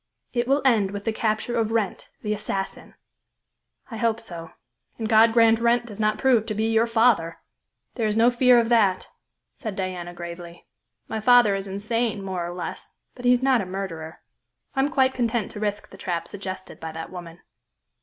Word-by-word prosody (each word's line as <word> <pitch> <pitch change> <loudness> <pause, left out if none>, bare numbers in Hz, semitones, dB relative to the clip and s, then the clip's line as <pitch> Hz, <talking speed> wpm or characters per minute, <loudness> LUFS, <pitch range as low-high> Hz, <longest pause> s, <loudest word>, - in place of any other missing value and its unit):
"It 240 -1 0
will 275 +2 +2
end 220 -7 +4
with 200 0 -6
the 225 - 0
capture 220 +2 -1
of 225 -1 0
Wrent, 220 -4 -2
the 210 -1 0
assassin." 195 -2 -5 1.0
"I 225 - -5
hope 230 -1 +1
so; 170 -7 -9 0.5
and 225 - -3
God 225 +1 +6
grant 225 -1 +5
Wrent 235 +1 +2
does 210 -3 -10
not 215 0 +1
prove 245 -5 +3
to 215 - -2
be 215 - 0
your 225 +1 +3
father!" 225 -8 +2 0.6
"There 225 -3 -1
is 210 +1 0
no 235 +2 +5
fear 250 0 +5
of 230 -1 +2
that," 205 -6 +2 0.4
said 220 -7 -6
Diana 180 -2 -4
gravely. 170 0 -9 0.4
"My 220 - -3
father 240 -2 +5
is 195 0 -3
insane 215 +2 -2
more 185 -2 -3
or 170 - -4
less, 180 - -7 0.2
but 245 - -10
he 245 - +6
is 250 +1 +1
not 260 -4 +4
a - - -4
murderer. 170 -4 -6 0.6
I - - -1
am 275 +2 +3
quite 265 -3 +2
content 235 -3 -1
to 210 - -8
risk 205 -1 -3
the - - -12
trap 170 -2 -3
suggested 190 -1 -7
by 160 0 -6
that 160 0 -7
woman." 175 -2 -9
215 Hz, 195 wpm, -24 LUFS, 190-235 Hz, 1.0 s, God